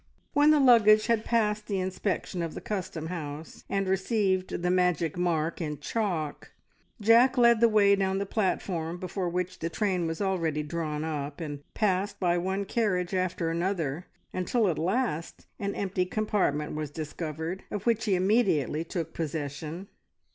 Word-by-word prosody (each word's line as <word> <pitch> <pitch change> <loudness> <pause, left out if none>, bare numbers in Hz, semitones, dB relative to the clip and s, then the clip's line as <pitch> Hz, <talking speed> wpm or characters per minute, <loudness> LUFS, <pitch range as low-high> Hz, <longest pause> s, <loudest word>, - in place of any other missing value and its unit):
When 295 0 +5
the 305 -1 +6
luggage 220 -5 +6
had 230 -2 +1
passed 215 -2 0
the 200 -3 -1
inspection 185 0 -2
of 165 -2 -4
the - - -4
custom 185 -6 -4
house 160 -2 -7
and 195 -1 0
received 190 -2 0
the 180 - +2
magic 180 -4 +1
mark 170 -2 0
in 150 -2 -3
chalk, 165 -3 -3 0.5
Jack 235 +5 +5
led 235 -2 +5
the 235 - +6
way 200 -2 +5
down 190 -1 0
the 200 - -1
platform, 180 -5 -1
before 185 0 -3
which 180 +1 -3
the 165 - -2
train 180 -2 0
was 160 0 -4
already 165 -6 0
drawn 150 -1 -3
up, 150 -2 -4
and 145 -4 -5 0.2
passed 200 0 0
by 175 -2 +2
one 190 +3 -1
carriage 190 -4 0
after 185 -3 0
another, 170 -3 -2 0.3
until 205 +5 +1
at 165 - -1
last 180 -2 -1
an 200 -1 -2
empty 185 -2 -1
compartment 185 -8 0
was 155 -1 -3
discovered, 160 +3 -5
of 205 -1 -5
which 225 -2 +2
he 200 -4 +2
immediately 180 - +2
took 165 -1 -4
possession. 155 +3 -4
185 Hz, 160 wpm, -28 LUFS, 165-205 Hz, 0.5 s, the